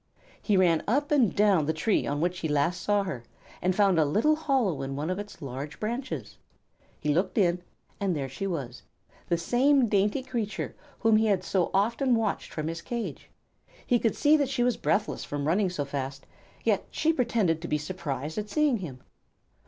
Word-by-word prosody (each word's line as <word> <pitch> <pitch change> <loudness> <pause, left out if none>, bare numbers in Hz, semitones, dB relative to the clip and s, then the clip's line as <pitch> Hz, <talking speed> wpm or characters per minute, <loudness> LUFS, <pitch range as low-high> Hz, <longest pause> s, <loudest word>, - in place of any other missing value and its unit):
He 205 -3 +2
ran 170 -4 +3
up 285 +7 +1
and 255 - +3
down 200 -8 +3
the 160 - +1
tree 200 +7 +1
on 145 +1 -1
which 175 +1 0
he 165 - -2
last 150 +4 +1
saw 205 -1 +2
her, 150 -12 -5 0.4
and 185 0 +1
found 195 -4 +4
a - - +5
little 215 - +3
hollow 265 - 0
in 135 0 -4
one 150 +5 -2
of 185 - -2
its 205 -6 -8
large 140 +3 -6
branches. 240 +5 -4 0.6
He 150 -1 +1
looked 185 +5 0
in, 180 -3 +3 0.4
and 195 -4 0
there 140 -3 -2
she 135 +9 -4
was, 135 -9 -4 0.5
the 170 - +2
same 255 - +3
dainty 210 +4 +1
creature 220 -6 -3 0.3
whom 225 -1 +5
he 220 0 +3
had 195 -3 +2
so 185 -2 +1
often 235 +6 +2
watched 225 -3 -1
from 155 -1 -3
his 165 +1 -4
cage. 235 +4 -5 0.6
He 245 - +3
could 225 - +1
see 300 +1 +5
that 285 -3 0
she 265 -3 0
was 245 -1 +2
breathless 210 +1 0
from 145 0 -3
running 185 +4 +2
so 150 -5 -3
fast, 135 -1 -5 0.4
yet - - +1
she 320 +1 +1
pretended 225 - +1
to 170 - -5
be 150 - +1
surprised 150 -1 -4
at 210 0 -5
seeing 300 -3 +2
him. 140 -10 -8
190 Hz, 195 wpm, -28 LUFS, 155-230 Hz, 0.6 s, a